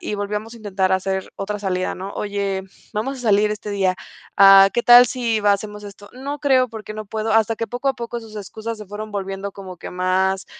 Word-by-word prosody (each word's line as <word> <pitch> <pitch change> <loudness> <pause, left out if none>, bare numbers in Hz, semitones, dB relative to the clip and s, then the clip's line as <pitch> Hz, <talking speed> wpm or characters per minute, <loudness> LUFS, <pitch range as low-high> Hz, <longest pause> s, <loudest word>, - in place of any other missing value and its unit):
y 275 - -4
volviamos 210 +3 -4
a - - -11
intentar 195 -3 -1
hacer 190 0 -1
otra 205 +1 -4
salida, 185 -2 -2
¿no? 190 +2 -7
"Oye, 200 -2 -2 0.3
vamos 260 +6 -2
a - - -8
salir 210 -2 +3
este 210 0 -6
día, 190 -2 +1 0.4
ah, 195 0 +9
¿qué 240 - +1
tal 245 +1 +9
si 230 -2 -1
hacemos 210 +1 0
esto?". 205 0 -11
"No 280 +3 -6
creo 260 -3 +3
porque 215 -1 -8
no 215 0 -6
puedo". 220 +1 -2
Hasta 225 0 +3
que 230 - -3
poco 245 +4 -2
a 270 - +1
poco 235 0 -5
sus 220 -1 -13
excusas 220 +2 -6
se 210 - -9
fueron 210 +2 -7
volviendo 195 0 -4
como 190 -2 -9
que - - -9
más 190 +1 0
210 Hz, 215 wpm, -21 LUFS, 195-225 Hz, 0.4 s, ah